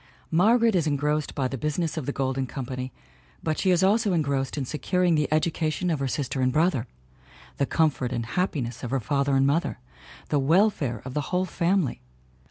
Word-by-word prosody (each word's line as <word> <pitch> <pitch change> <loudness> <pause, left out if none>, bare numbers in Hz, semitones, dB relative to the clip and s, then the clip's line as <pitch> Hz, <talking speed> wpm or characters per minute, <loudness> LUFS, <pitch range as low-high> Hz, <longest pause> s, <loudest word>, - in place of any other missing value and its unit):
Margaret 225 +7 +4
is 170 -4 +2
engrossed 150 +1 0
by 135 -3 0
the 135 0 -5
business 150 +3 -1
of 155 -6 -4
the - - 0
Golden 135 -1 -1
Company 130 0 -5 0.5
but 155 -1 -1
she 190 - +2
is 180 0 +3
also 205 +1 +3
engrossed 140 -4 0
in 140 - -1
securing 180 +5 +1
the 150 -2 +1
education 160 +2 0
of 155 - -1
her 135 - -1
sister 130 0 -2
and 130 0 +2
brother, 150 -5 +1 0.7
the 140 - +1
comfort 145 -6 +1
and 120 -2 -2
happiness 125 -5 -2
of 120 - -4
her 135 +2 0
father 140 +2 0
and 135 0 +4
mother, 145 +5 +1 0.5
the 145 - +2
welfare 150 - +2
of 130 - -6
the 150 0 -2
whole 180 +1 +1
fam 185 +1 +1
ily. 130 - -5
150 Hz, 190 wpm, -26 LUFS, 135-170 Hz, 0.7 s, Margaret